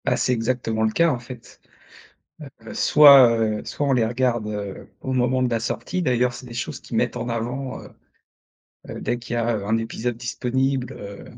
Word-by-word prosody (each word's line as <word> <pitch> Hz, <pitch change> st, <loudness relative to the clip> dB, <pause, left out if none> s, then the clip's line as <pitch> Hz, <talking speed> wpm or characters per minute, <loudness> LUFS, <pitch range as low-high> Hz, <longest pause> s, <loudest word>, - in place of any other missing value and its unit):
Bah, -, -, +1 dB
c'est 125 Hz, -, +1 dB
exactement 115 Hz, -1 st, -1 dB
le 110 Hz, -, +2 dB
cas, 170 Hz, +8 st, +3 dB
en 125 Hz, -, -2 dB
fait. 120 Hz, -1 st, -12 dB, 1.0 s
Heu, -, -, -10 dB
soit, 140 Hz, -5 st, +8 dB
heu, 110 Hz, -1 st, 0 dB
soit 145 Hz, -, -2 dB
on 135 Hz, -, +3 dB
les 120 Hz, -3 st, +2 dB
regarde, 120 Hz, -1 st, 0 dB
heu, 105 Hz, -2 st, -6 dB
au 130 Hz, -, -3 dB
moment 130 Hz, 0 st, +1 dB
de 125 Hz, -, +1 dB
la 115 Hz, -1 st, 0 dB
sortie, 180 Hz, +10 st, -3 dB
d'ailleurs 125 Hz, -2 st, +1 dB
c'est 125 Hz, -, -10 dB
des 120 Hz, -, -10 dB
choses 120 Hz, -1 st, -4 dB
qu'ils -, -, -8 dB
mettent -, -, 0 dB
en -, -, -4 dB
avant, 125 Hz, +3 st, -4 dB
heu, -, -, -12 dB, 1.0 s
heu, -, -, -7 dB
dès 120 Hz, -, -2 dB
qu'il 120 Hz, 0 st, -6 dB
y -, -, -1 dB
a, 115 Hz, -1 st, 0 dB
heu, 100 Hz, -, -5 dB
un 110 Hz, +2 st, +2 dB
épisode 115 Hz, +1 st, -3 dB
disponible, 130 Hz, +2 st, -2 dB
heu, 100 Hz, -3 st, -9 dB
120 Hz, 205 wpm, -23 LUFS, 115-130 Hz, 1.0 s, soit